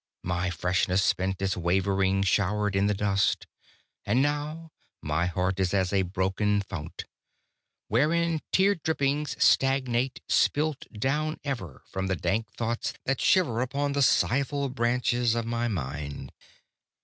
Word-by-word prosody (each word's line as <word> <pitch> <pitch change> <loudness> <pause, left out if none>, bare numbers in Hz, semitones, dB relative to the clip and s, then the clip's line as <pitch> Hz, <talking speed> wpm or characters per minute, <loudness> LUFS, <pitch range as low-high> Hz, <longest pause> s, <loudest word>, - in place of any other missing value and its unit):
My 90 0 -1
freshness 90 +2 +1
spent 95 +1 0
its 95 0 0
wavering 95 +2 +1
shower 105 +2 +1
i' - - +3
the 105 - +1
dust; 100 -1 +1 0.6
And 110 +5 +1
now 150 +3 -2 0.3
my 75 +4 -1
heart 90 +1 -1
is 95 0 +1
as 95 -1 +1
a 100 - +3
broken 95 +2 0
fount, 80 -5 -7 0.8
Wherein 160 +7 +2
tear 195 +2 +4
drippings 150 -4 -1
stagnate, 130 -1 +2
spilt 150 -1 +1
down 150 +7 -1
ever 120 - -5
From 95 0 -4
the 95 - 0
dank 110 +5 -1
thoughts 115 0 -2
that 135 -1 0
shiver 135 -12 +3
Upon 140 +3 -1
the 140 0 0
sighful 140 +2 +2
branches 120 -1 +1
of 115 -1 -1
my 120 +1 -1
mind. 70 - -5
110 Hz, 135 wpm, -27 LUFS, 95-135 Hz, 0.8 s, tear